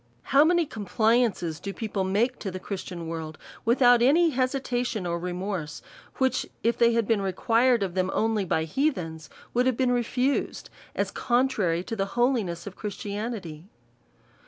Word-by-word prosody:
How 275 +2 +5
many 345 +1 +3
compliances 220 - 0
do 200 - -5
people 205 -3 -3
make 215 +7 0
to 200 - -4
the 185 0 -6
Christian 180 -4 -6
world, 160 -1 -5 0.3
without 245 0 +5
any 320 +7 +5
hesitation 250 -5 -1
or 170 0 -1
remorse; 180 -3 -4 0.3
which, 260 -1 +1 0.2
if 230 +1 +2
they 235 0 +4
had 230 -2 +1
been 225 -3 +2
required 230 +5 +2
of 185 -3 -3
them 185 0 0
only 220 -2 +1
by 160 -3 0
hea 270 - +1
thens, 160 - -7 0.2
would 245 +1 +2
have 255 -3 +1
been 255 -2 +2
refused, 250 +3 -1 0.2
as - - -1
contrary 240 -9 +1
to 225 - -5
the 195 -2 0
ho 240 0 +4
liness 175 -8 -3
of 200 -2 -8
Christianity 205 -5 -5
220 Hz, 160 wpm, -26 LUFS, 185-245 Hz, 0.3 s, How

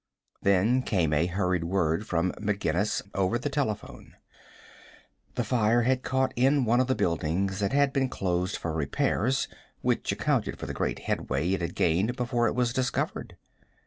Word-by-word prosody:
Then 100 +6 +3
came 90 -10 0
a 75 +3 +2
hurried 90 -1 0
word 85 +1 0
from 85 +1 +1
McGinnis 105 -2 0
over 95 +4 +1
the 140 +4 -3
telephone. 130 -7 -3 1.2
The 120 - 0
fire 115 0 +2
had 130 +1 +2
caught 130 0 0
in 135 +2 +3
one 120 +2 +3
of 130 - +2
the 130 - +1
buildings 90 +4 0
that 100 -1 0
had 140 0 +3
been 135 -1 +1
closed 90 -2 -1
for 85 - -4
repairs, 100 - 0 0.3
which - - 0
accounted - - 0
for - - -6
the - - -4
great - - -1
headway 70 +8 -1
it 95 -2 0
had 85 +1 -3
gained 95 +9 +1
before 120 -1 0
it - - -1
was 125 -1 +1
discovered. 125 -1 -2
105 Hz, 165 wpm, -28 LUFS, 90-125 Hz, 1.2 s, Then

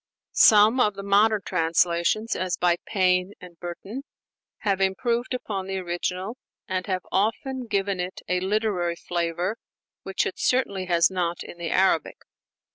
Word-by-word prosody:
Some 215 +4 +6
of 210 -4 +3
the 200 - -7
modern 205 +1 +3
translations 170 +5 +1
as 185 -1 -2
by 175 -1 +2
Payne 185 -1 +2
and 175 -2 -13
Burton 190 +8 -6 0.6
have 195 -3 0
improved 235 +6 0
upon 195 -6 -4
the 195 0 -3
original, 185 +4 -3 0.3
and 185 -1 -2
have 185 -2 -2
often 240 +5 -1
given 200 -2 -1
it 180 +1 -4
a 180 0 +1
literary 190 -3 0
flavor 175 +4 -2 0.4
which 195 0 -1
it - - -4
certainly 200 -7 +1
has 170 0 +3
not 175 -2 -2
in 175 - -11
the 170 -1 -3
Arabic. 190 -4 +2
190 Hz, 145 wpm, -25 LUFS, 175-210 Hz, 0.6 s, Some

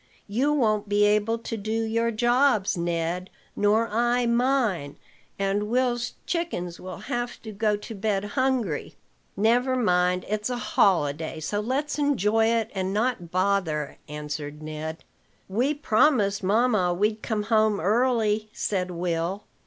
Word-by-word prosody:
"You 255 +8 +1
won't 215 -7 +1
be 205 0 +4
able 210 +2 +2
to 230 0 -5
do 220 +2 -2
your 230 +1 0
jobs, 240 -2 +2
Ned, 170 +1 -2 0.3
nor 215 +3 +2
I 240 +3 +1
mine, 235 - +1 0.4
and 200 +1 -1
Will's 245 0 0
chickens 305 - -3
will 185 -2 -8
have 240 0 -3
to 220 - -7
go 210 0 +1
to 210 +2 -8
bed 205 -1 -1
hungry." 255 - -1 0.4
"Never 245 +5 +3
mind: 180 -6 +2
it's 210 +2 -2
a 245 - -2
holiday, 160 -8 +1
so 185 +7 -2
let's 270 +8 -2
enjoy 225 -6 +2
it, 230 -1 0
and 190 -1 -2
not 220 -6 -1
bother," 180 -5 0
answered 150 0 -6
Ned. 155 +1 -6 0.4
"We 245 +10 0
promised 220 -6 +2
mamma 205 -3 +2
we'd 210 +3 0
come 215 -3 -2
home 215 -1 +2
early," 215 +1 +1
said 185 -3 -1
Will. 175 +2 -2
210 Hz, 135 wpm, -25 LUFS, 180-240 Hz, 0.4 s, be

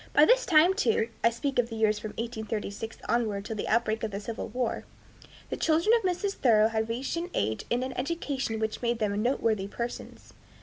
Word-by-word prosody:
By - - +7
this - - +4
time, 335 +2 +6
too, 230 - +1
I 230 - +6
speak 260 +3 -2
of 235 -1 +1
the 225 - -6
years 215 -1 +2
from 210 0 -6
1836 220 -1 -4
onward 215 -4 0
till 220 - -4
the 205 - -3
outbreak 225 -1 +1
of 220 - -2
the 200 -1 -4
civil 220 +2 -5
war, 245 +1 -2 0.7
the - - 0
children 330 +7 +3
of 465 - +2
Mrs. 380 +1 -1
Thoreau 220 -3 +4
had 220 0 -1
reached 255 +7 -2
an 345 +2 -3
age 110 0 -1
and 245 +1 +1
an 260 0 -4
education 270 -4 -2
which 220 0 -2
made 235 -1 0
them 210 -2 0
noteworthy 220 -5 +1
persons. 235 +4 -7
230 Hz, 205 wpm, -28 LUFS, 220-270 Hz, 0.7 s, By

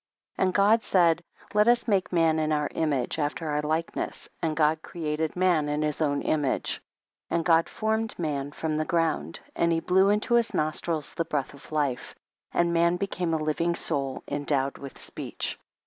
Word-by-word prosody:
And 185 -1 +2
God 205 +4 +4
said 170 -4 +3 0.3
let 210 +1 +4
us 240 0 +4
make 195 -4 +1
man 165 -2 +3
in 155 0 0
our 150 -1 +1
image, 145 -3 0
after 155 +2 -2
our 150 0 0
likeness, 155 +2 -2
and 155 -2 -1
God 155 0 +3
created 155 -2 -3
man 175 -5 +2
in 150 +1 0
his 150 +1 -2
own 145 -2 +1
image. 145 -4 0 0.5
2. - - -1
And 165 -1 0
God 165 -1 +4
formed 220 0 -1
man 145 -4 -2
from 155 +1 -2
the 155 - +1
ground, 160 - -1
and 170 - +2
he 165 - +2
blew 190 +4 +3
into 210 +3 +1
his 235 -1 +3
nostrils 155 0 -1
the 165 - -1
breath 145 -4 -2
of 140 +2 -15
life, 145 -5 -1 0.4
and 170 0 +2
man 170 +1 +3
became 180 -2 -2
a 155 - -1
living 165 +3 0
soul 135 -4 -1
endowed 140 -1 -1
with 140 -2 -9
speech. - - -5
160 Hz, 180 wpm, -27 LUFS, 150-175 Hz, 0.5 s, God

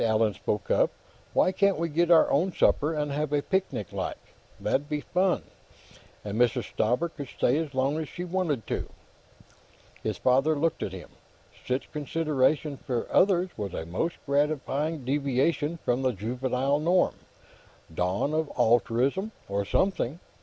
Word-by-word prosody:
Allan 110 -1 +2
spoke 95 0 -3
up. - - +4 0.4
"Why - - +3
can't 200 +1 +2
we 170 +1 0
get 165 +2 +1
our 170 -2 +7
own 175 +7 +2
supper, 150 0 +3
and 150 -1 -1
have 150 +1 -1
a 145 -1 +1
picnic, 190 - -2
like? - - -3 0.4
That'd 145 +2 -1
be 150 -1 -1
fun, 185 +3 +1 0.8
and 105 +2 -3
Mrs. 120 -2 +1
Stauber 125 +10 +1
could 145 -4 -8
stay 125 +3 +1
as 150 -4 -4
long 135 +4 +1
as 160 - -4
she 175 - -6
wanted 170 -9 -1
to." - - -3 1.1
His - - -2
father 135 +5 +3
looked 160 +2 0
at - - -2
him. 95 -1 -9 0.6
Such 130 +1 -2
consideration 150 -1 0
for 125 -2 -3
others 185 -1 +3
was 100 -4 -4
a 80 - -4
most 95 - -2
gratifying 145 0 0
deviation 145 +4 0
from 125 +2 +1
the 130 -1 +1
juvenile 125 +6 -1
norm; 175 +4 +3 0.8
dawn 90 - 0
of 155 -1 0
altruism, 125 - +2 0.2
or 100 0 -1
something. 170 - 0
145 Hz, 155 wpm, -27 LUFS, 125-165 Hz, 1.1 s, our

